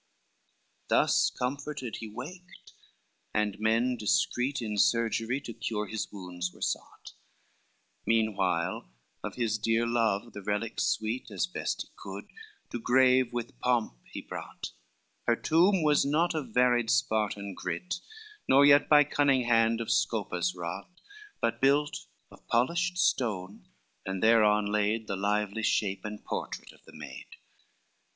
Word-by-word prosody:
XCIV - - -44
Thus - - +3
comforted 135 -1 -4
he 110 - -7
waked, 175 - -10 0.6
and 105 -1 0
men 115 +3 +2
discreet 125 +4 +1
In 110 -3 -3
surgery 115 +3 +2
to 115 - -7
cure 110 -2 -3
his 110 +1 -4
wounds 90 -3 -5
were - - -19
sought, - - -4 0.9
Meanwhile 95 - 0 0.3
of - - -5
his 110 -3 0
dear 115 +2 +1
love 115 -2 0
the 100 - -7
relics 105 +3 -1
sweet, 110 +4 -1
As - - -1
best 180 - -3
he - - -22
could, - - -8 0.5
to 120 - -3
grave 130 +1 +4
with 120 -1 -5
pomp 120 - +1 0.2
he - - -6
brought: - - -7 0.6
Her 120 - +4
tomb 175 +7 +3
was 150 -1 +4
not 160 +5 +1
of 155 -3 -3
varied 120 -2 +3
Spartan 110 -5 0
greet, 90 - -4 0.5
Nor 140 +2 +7
yet 145 0 +6
by 150 -1 +8
cunning 140 -2 +2
hand 115 -1 +3
of 115 - -2
Scopas 90 0 0
wrought, 90 +2 -6 0.5
But 115 0 -1
built 145 +2 +2 0.2
of - - -18
polished 170 +10 +1
stone, 100 - 0 0.4
and 95 -1 -4
thereon 105 -2 +5
laid 105 +2 0
The 100 - -3
lively 105 +2 -1
shape 100 -3 0
and 105 0 -7
portrait - - -5
of - - -22
the - - -15
maid. - - -9
115 Hz, 140 wpm, -29 LUFS, 105-130 Hz, 0.9 s, by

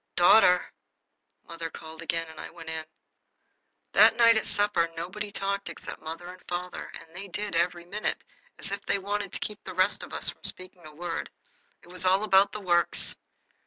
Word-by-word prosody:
"Daughter!" 180 0 +6 0.8
mother 165 -1 -5
called 160 0 -10
again, 165 0 0
and 160 -1 -11
I - - -7
went 165 -1 -8
in. 160 -1 -4 1.1
That - - +7
night 230 -1 +6
at 220 - 0
supper 195 -5 +2
nobody 205 +5 -4
talked 200 -1 -2
except 170 - -8
father 165 +2 -6
and 180 +1 -10
mother, 180 +1 -4
and 165 +1 -17
they 195 +2 -7
did 205 +1 -4
every 175 +1 +1
minute, 205 +4 -3 0.3
as 195 - -2
if 200 0 -4
they - - +2
wanted 200 0 -3
to - - -4
keep 210 -1 -6
the - - -7
rest 185 +2 +2
of - - -9
us - - +3
from - - -22
speaking 185 -3 0
a 150 - -14
word. 170 +1 -4 0.5
It - - -17
was 180 +1 -3
all 190 +2 +4
about 200 -1 +5
the 210 - -6
Works. 175 -2 +1
180 Hz, 190 wpm, -28 LUFS, 170-200 Hz, 1.1 s, That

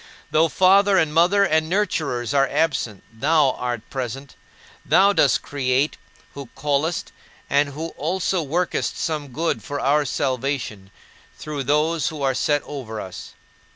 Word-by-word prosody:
Though 160 +2 +4
father 195 +3 +4
and 155 -4 +2
mother 180 +5 +4
and 160 -3 +1
nurturers 145 - -1
are 135 -1 +3
absent, 145 - -1
thou 145 +3 +3
art 120 -3 -4
present, 135 +1 -5 0.5
who 200 +2 +5
dost 140 - +3
create, 135 +1 0 0.4
who 140 -2 -8
callest, 150 +3 -1 0.4
and 145 +1 +3
who 155 +4 -5
also 180 +4 -1
workest 170 +4 -1
some 155 -3 -2
good 155 +6 -2
for 145 -1 -4
our 145 +2 +2
salvation, 130 -7 -2 0.5
through 150 -3 -5
those 150 +3 +1
who 155 -4 -4
are 135 -1 +2
set 145 +3 +1
over 120 -7 -7
us. 95 -3 -8
145 Hz, 140 wpm, -22 LUFS, 135-165 Hz, 0.5 s, who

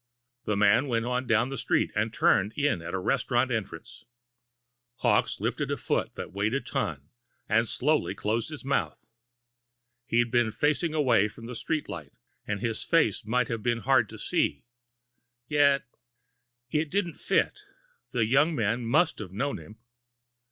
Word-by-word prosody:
The 105 - 0
man 105 +7 +4
went 115 -2 0
on 125 +1 -1
down 115 +2 +2
the 135 - -4
street, - - +1
and - - 0
turned 105 +4 +2
in 145 - 0
at 85 - -6
the - - -2
restaurant 125 +5 +1
entrance. 110 -5 -5 0.9
Hawkes - - +1
lifted - - -2
a - - -1
foot - - -1
that - - -6
weighed 105 +5 0
a - - +2
ton 75 - -4 0.4
and 115 +2 +2
slowly 150 -8 +1
closed 110 +5 -1
his 150 -3 -8
mouth. 90 - -1 1.0
He'd 120 0 +2
been 120 -2 +3
facing 155 +6 0
away 120 -9 +3
from 115 +2 -12
the 125 - -6
street 150 +6 -2
light 80 -5 -8 0.3
and 100 -1 -2
his 115 -2 -2
face 150 - +2
might 125 +1 +1
have 115 -2 -3
been 120 +1 0
hard 130 -4 +3
to - - -10
see. - - -1 0.8
Yet.... 140 -2 +3 0.9
It 155 0 0
didn't 185 -1 -1
fit. - - 0 0.5
The 115 -3 +1
young 145 +8 +3
man 115 +1 0
must 155 +7 +2
have 100 -5 -7
known 135 +6 -2
him! 105 +8 -13
120 Hz, 160 wpm, -28 LUFS, 105-140 Hz, 1.0 s, man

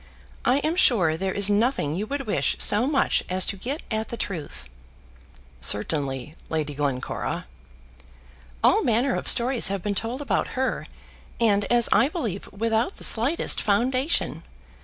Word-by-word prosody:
I 250 +2 +3
am 315 +2 0
sure 190 - +3
there 190 +3 -3
is 200 -1 +4
nothing 205 - +1
you 200 +6 -3
would 280 +1 -4
wish 210 - 0
so 215 +5 +3
much 275 -2 +1
as 185 0 +3
to - - -1
get 260 +10 -5
at 220 0 -2
the 235 - -6
truth." 155 - -6 0.9
"Certainly, 135 - -2 0.2
Lady 155 -2 -2
Glencora." 140 -3 -3 1.2
"All - - +5
manner 240 +3 +1
of - - -3
stories 245 +1 +5
have 195 -2 -3
been 205 - -1
told 230 +6 -3
about 285 -2 -2
her, 265 0 -1 0.5
and, 205 -3 +2
as 240 -1 +3
I 270 - +4
believe, 230 - -5
without 225 - -1
the - - -5
slightest 255 +9 +1
foundation. 250 - 0
215 Hz, 150 wpm, -24 LUFS, 180-255 Hz, 1.2 s, All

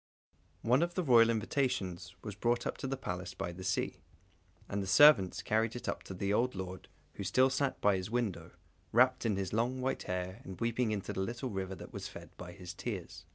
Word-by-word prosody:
One 125 +5 +4
of 175 0 0
the 185 - 0
royal 120 -5 +6
invitations 110 -6 -1
was 105 - -5
brought 120 +4 +1 0.2
to - - -3
the 135 +1 -2
Palace 90 -6 -5
by 85 - -3
the 90 +2 -9
sea, 95 -1 -1 0.7
and 100 - -2
the 95 - -4
servants 145 -6 +6
carried 110 +1 +1
it 120 - -6
up - - -2
to 95 - -7
the 100 +2 -1
old 125 +2 +1
lord 95 0 -6 0.3
who 100 - -6
still 130 +8 +4
sat 135 +1 0
by 100 -2 +4
his 95 +2 -4
window, 115 -5 -2 0.4
wrapped 125 +1 +4
in 105 - +1
his 95 -1 -3
long 120 +4 +1
white 130 +1 -1
hair 90 +1 -3
and 95 -1 -9
weeping 115 0 +1
into 100 -3 -3
the 95 - -2
little 120 +5 -3
river 95 -1 -3
that - - -11
was - - -5
fed - - -11
by 90 -1 -9
his 90 -1 -8
tears. 100 -1 -6
105 Hz, 210 wpm, -33 LUFS, 95-125 Hz, 0.7 s, royal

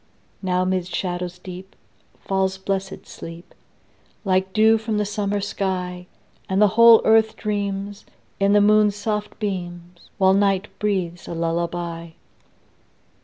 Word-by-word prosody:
Now 185 -1 0
'mid 185 -1 -1
shadows 180 -1 -4
deep 185 +1 -10 0.5
Falls 190 -1 -1
blessed 195 0 -4
sleep, 165 +1 -11 0.7
Like 190 0 +1
dew 220 +2 +4
from 220 -1 -2
the 210 - 0
summer 205 0 -2
sky; 180 -3 -3 0.4
And 190 +1 +1
the 210 -1 +6
whole 230 +2 +7
earth 220 0 +4
dreams, 200 -1 -3 0.4
In 200 +1 +3
the 205 - +5
moon's 210 0 +4
soft 210 0 -3
beams, 175 -4 -6
While 190 0 +4
night 195 0 +1
breathes 185 -5 -2
a 170 - -5
lullaby. 170 0 -3
190 Hz, 125 wpm, -22 LUFS, 180-205 Hz, 0.7 s, whole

